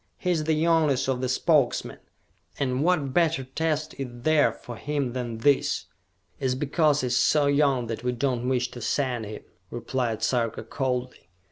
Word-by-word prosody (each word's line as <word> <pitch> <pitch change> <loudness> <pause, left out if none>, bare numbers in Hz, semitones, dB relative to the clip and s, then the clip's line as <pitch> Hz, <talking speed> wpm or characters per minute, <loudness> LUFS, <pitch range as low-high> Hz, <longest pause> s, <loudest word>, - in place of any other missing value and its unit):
"He 180 - -1
is 160 -3 0
the 160 0 +2
youngest 155 -5 +2
of 130 -2 -1
the 130 - -1
Spokesmen, 140 0 +1 0.6
and 130 0 0
what 155 -6 +1
better 165 -4 +2
test 155 +3 -2
is 135 - -2 0.2
there 155 -1 +4
for 120 - -10
him 140 -3 -2
than 120 -3 -4
this?" 140 +4 +2 0.5
"It 135 - -3
is 125 - 0
because 150 +2 +2
he - - -2
is 125 0 0
so 150 -2 +3
young 140 -3 +2
that 115 0 -5
we 125 - +1
do 125 +1 0
not 120 - -5
wish 125 -1 0
to 120 - -9
send 120 -1 -1
him," 105 - -8 0.3
replied 120 -2 -2
Sarka 115 -2 0
coldly. 125 0 -3
130 Hz, 180 wpm, -26 LUFS, 125-150 Hz, 0.6 s, there